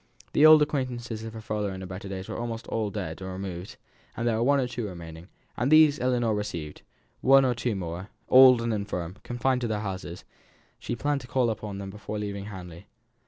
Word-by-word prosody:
The 155 - +7
old 155 -1 +9
acquaintances 120 -6 -3
of 115 0 -7
her 110 - -7
father 105 -2 -2
in 95 0 -7
his 95 - -6
better 95 +2 -7
days 95 -1 -6
were - - -5
almost 115 -1 -4
all 110 -2 -1
dead 95 -5 -5
or 95 0 -5
removed; 95 -1 -6 0.4
there 115 -1 +1
were - - -1
one 140 +3 +4
or 130 - 0
two 120 -3 -4
remaining, 85 -2 -9 0.3
and 125 +5 0
these 155 -1 +6
Ellinor 120 -3 +1
received; 85 -8 -4 0.4
one 135 0 +6
or 125 - +2
two 120 -1 -2
more, 90 +1 -5 0.2
old 130 -2 +8
and 115 -1 0
infirm, 100 -3 -4
confined 125 +1 0
to 120 - -1
their 105 -2 -2
houses, 95 -3 -6 0.5
she 120 - -4
planned 145 +3 -1
to 120 - -11
call 125 -1 +1
upon 100 -2 -6
before 105 +1 -6
leaving 100 -1 -4
Hamley. 90 -2 -9
110 Hz, 205 wpm, -27 LUFS, 95-125 Hz, 0.5 s, old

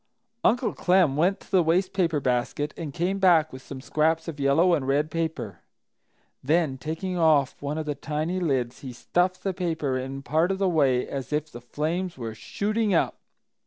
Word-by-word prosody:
Uncle 240 +1 +2
Clem 180 -6 +3
went 185 +6 +2
to - - -19
the 185 - +5
waste 175 +3 +1
paper 170 -6 +1
basket 130 +3 -1
and 160 -4 -5
came 180 +6 -1
back 170 -6 +4
with 130 - -8
some 135 0 -9
scraps 160 +4 0
of 155 -3 -6
yellow 150 +6 +4
and 140 -5 0
red 145 +3 +1
paper. 145 - -3 0.8
Then, 150 -2 +1
taking 175 +5 -3
off 155 -5 +3
one 145 +2 -3
of 160 - -3
the 150 - -1
tiny 155 +5 -3
lids, 130 -8 -1
he 130 -3 -8
stuffed 180 +9 0
the 195 - -1
paper 160 -7 -1
in 135 +1 -6
part 160 +5 +1
of 195 - 0
the 195 0 +1
way 140 -7 +2
as 135 0 -5
if 150 +1 -1
the 120 - -9
flames 165 +8 -3
were 115 -3 -5
"shooting 210 - -1
up!" - - +1
155 Hz, 190 wpm, -26 LUFS, 140-180 Hz, 0.8 s, the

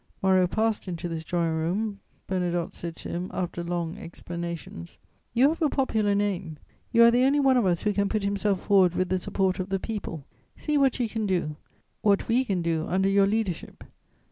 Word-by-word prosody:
Moreau 190 -1 +4
passed 220 +2 -1
into 175 -1 -4
this 165 -1 -4
drawing 170 0 0
room; 195 +6 -1 0.3
Bernadotte 175 -2 -1
said 170 -1 -6
to - - -8
him, 175 +2 -3
after 175 -1 -3
long 170 -1 -3
explanations: 170 - -7 0.4
"You 260 +4 +5
have 330 +2 -3
a 310 - +3
popular 220 -8 +1
name; 190 -6 -2 0.3
you 235 -1 +6
are 235 - +8
the 245 +2 +3
only 275 +2 +3
one 270 -2 +4
of 240 -6 +3
us 175 -2 +1
who 210 - +1
can 200 0 +1
put 215 -2 -1
himself 200 -1 0
forward 190 -4 +4
with 185 -1 0
the 185 0 +1
support 190 +1 0
of 185 +1 -3
the 195 - +1
people; 185 -9 -5 0.3
see 300 - -2
what 275 -3 +3
you 240 - +1
can 220 -1 -2
do, 175 -5 -1 0.5
what 200 -2 +2
we 240 +3 +3
can 190 -8 -1
do 165 -1 -1
under 190 +2 +2
your 195 0 +4
leader 210 -3 +1
ship." - - -12
190 Hz, 205 wpm, -26 LUFS, 175-220 Hz, 0.5 s, are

